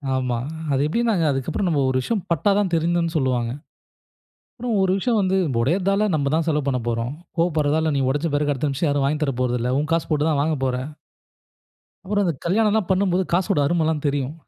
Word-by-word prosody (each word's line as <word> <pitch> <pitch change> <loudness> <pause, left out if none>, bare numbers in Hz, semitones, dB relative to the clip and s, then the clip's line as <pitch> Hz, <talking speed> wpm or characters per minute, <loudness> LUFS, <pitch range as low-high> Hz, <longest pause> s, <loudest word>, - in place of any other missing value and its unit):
ஆமா. 125 -2 -1 0.4
அது 135 - +1
எப்படினாங்க, 225 -1 +1
அதுக்கப்புறம் 135 +8 -2
நம்ம 150 -4 +1
ஒரு 130 - +1
விஷயம் 205 - -2
பட்டாதான் 200 +3 +2
திருந்துனு 170 0 +1
சொல்வாங்க. 125 -4 0 1.0
அப்புறம் 240 -2 -2
ஒரு 190 -1 +2
விஷயம் 230 +3 +1
வந்து 190 -1 +1 0.2
உடைறதால, 195 - +1
நம்ம 140 -2 0
தான் 165 0 +1
செலவு 150 -3 0
பண்ணப்போறோம், 120 -2 -1 0.3
கோவப்படுறதால 160 -2 +1
நீ - - +1
உடைச்ச 145 +5 0
பிறகு, 145 0 +1
அடுத்த 145 +1 -1
நிமிஷம் 145 +4 -1
யாரும் 140 -1 +1
வாங்கித் 150 +2 0
தரப்போறதில்லை, 125 -2 -1
உன் 155 +2 -3
காசு 165 0 +1
போட்டு 150 -1 +1
தான் 145 -2 +1
வாங்கப் 150 -3 -1
போற. 130 -1 0 1.3
அப்புறம் 205 +1 0
அந்த 170 - +1
கல்யாணம்லாம் 210 +2 +2
பண்ணும்போது 190 -1 +2
காசோட 175 -4 +2
அருமைலாம் 160 -1 0
தெரியும். 140 0 -1
155 Hz, 170 wpm, -22 LUFS, 140-185 Hz, 1.3 s, பட்டாதான்